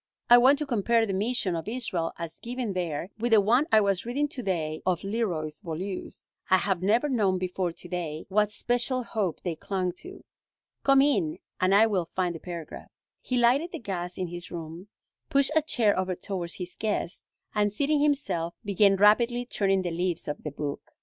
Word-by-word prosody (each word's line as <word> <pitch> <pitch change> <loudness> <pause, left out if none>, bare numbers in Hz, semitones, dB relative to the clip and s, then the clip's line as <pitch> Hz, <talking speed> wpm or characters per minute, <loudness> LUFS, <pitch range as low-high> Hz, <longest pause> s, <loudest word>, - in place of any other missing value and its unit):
I 240 - +10
want 265 +4 +6
to 300 - -2
compare 235 -2 +2
the 200 - -3
mission 205 -2 0
of 165 +2 -5
Israel 215 -8 -2
as 170 -1 -7
given 240 -3 -4
there 175 0 -3
with 235 +1 +1
the 220 - +8
one 240 +9 +3
I 220 -1 +6
was 195 -3 +1
reading 275 +5 -1
to 265 - -5
day 160 -7 -2
of 180 -3 0
Leroy 195 -7 -1
Beaulieu's. 180 +3 -6 0.2
I 185 - +6
have 190 -2 -1
never 225 +9 +2
known 210 -9 +1
before 180 -1 -2
to 175 - -10
day 170 -3 -4
what 210 +2 +2
special 245 +3 0
hope 210 -7 -2
they 175 -3 -2
clung 185 +1 -2
to. 380 +2 -11 0.6
Come 275 0 +5
in 185 - +1 0.2
and 185 +1 +3
I 215 +2 +7
will 190 -6 -1
find 180 -2 0
the 165 - -7
paragraph." 170 -2 -8 0.3
He 250 - -2
lighted 260 +8 +3
the - - -3
gas 180 -5 -5
in 185 -2 -3
his 175 +1 -7
room, 170 +2 -7 0.4
pushed 275 +1 +3
a 315 - +5
chair 235 -9 +2
over 185 -1 -1
towards 175 -2 -5
his 180 -1 -6
guest, 210 -5 -2 0.3
and, 205 -1 +2
seating 285 +7 +1
himself, 270 - 0
began 200 0 +4
rapidly 235 +5 +4
turning 195 -5 +1
the 175 - -2
leaves 175 0 -2
of 150 - -4
the 150 - -4
book. 145 0 -6
195 Hz, 195 wpm, -27 LUFS, 175-240 Hz, 0.6 s, I